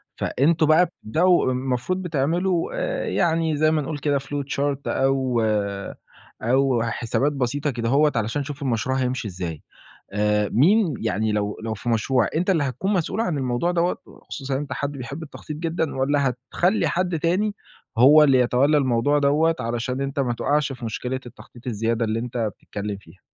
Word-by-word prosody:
فأنتم 155 +4 +2
بقى 155 +4 +5
بتبدأوا 170 0 +1
المفروض 130 +8 -1
بتعملوا 170 +2 0
آآ - - -2
يعني 165 -2 +1
زي 155 +1 +3
ما 155 -1 +1
نقول 150 +1 -4
كده 145 0 +1
flowchart 140 0 -2
أو 130 -3 +1 1.0
أو 130 +1 +2
حسابات 120 +4 0
بسيطة 140 +2 -1
كدهوّة 130 +6 +2
عشان 115 +6 -1
أشوف 145 +1 -7
المشروع 130 0 0
هيمشي 125 -3 -1
إزاي، 90 -5 -5 0.5
آآ 105 0 +1
مين 180 - +4
يعني 110 -1 0
لو 105 0 -1
لو 110 -1 -2
في 120 - -7
مشروع، 120 +2 +2
أنت 180 +4 +1
اللي 165 -6 +2
هتكون 165 +9 -2
مسؤول 190 +3 -1
عن 175 -10 0
الموضوع 130 +6 0
دَوّة 175 0 0
وخصوصًا 135 -1 -6
إن - - 0
أنت 145 - -6
حد 145 0 -2
بيحب 140 +3 -7
التخطيط 150 0 -8
جدًا 160 -2 -2
والّا 140 +1 +2 0.3
هتخلّي 185 +5 +2
حد 180 -2 0
تاني 190 +6 0 0.4
هو 145 +6 +8
اللي 135 -3 +5
يتولّى 125 +5 +3
الموضوع 135 +1 +2
دَوّة 150 +3 +3
علشان 120 +2 -2
أنت 140 +1 -2
ما 125 -3 0
تُقعَش 145 +4 0
في 125 -2 -8
مشكلة 125 +3 -3
التخطيط 120 0 -14
الزيادة 115 0 0
اللي 110 0 -1
أنت 120 +1 -5 0.2
بتتكلّم 105 0 -5
فيها؟ 95 -1 -19
135 Hz, 165 wpm, -23 LUFS, 120-155 Hz, 1.0 s, هو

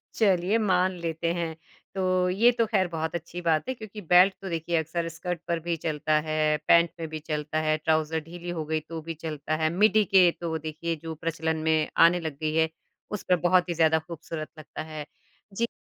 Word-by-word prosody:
चलिए 195 0 +3
मान 185 -3 +2
लेते 165 0 -2
हैं। 170 -2 -3 0.4
तो 185 -1 +1
ये 225 +7 +5
तो 235 -1 +1
खैर 185 -3 +2
बहुत 160 +1 -2
अच्छी 170 +1 -5
बात 165 +1 +1
है - - 0
क्योंकि 215 -2 -9
बेल्ट 180 +2 +5
तो 190 - -5
देखिए 165 0 -1
अक्सर 165 +2 -2
स्कर्ट 175 0 -4
पर 170 -1 0
भी 170 - +1
चलता 155 -1 0
है, 155 -1 +2
पैंट 170 0 +5
में 165 - -3
भी 155 - -5
चलता 155 0 -3
है, 155 0 +1
ट्राउज़र 160 0 +1
ढीली 175 +2 -8
हो 165 -3 -3
गई 155 +1 0
तो 165 -1 -5
भी 165 +1 -5
चलता 155 -1 -4
है, 155 0 +1
मिडी 215 +5 +4
के 185 -2 +6
तो 160 -1 -2
देखिए 160 +2 -4
जो 160 -1 -5
प्रचलन 160 0 -2
में 155 -1 +2
आने 170 +2 +6
लग 160 -4 -5
गई 155 0 0
है, 160 0 +3 0.4
उस 210 - -4
पर 180 - +6
बहुत 180 0 +3
ही 170 - +1
ज़्यादा 160 -1 +3
खूबसूरत 160 -1 -7
लगता 155 - -8
है। 155 -1 -7 0.5
जी 235 +4 0
165 Hz, 210 wpm, -27 LUFS, 155-180 Hz, 0.5 s, के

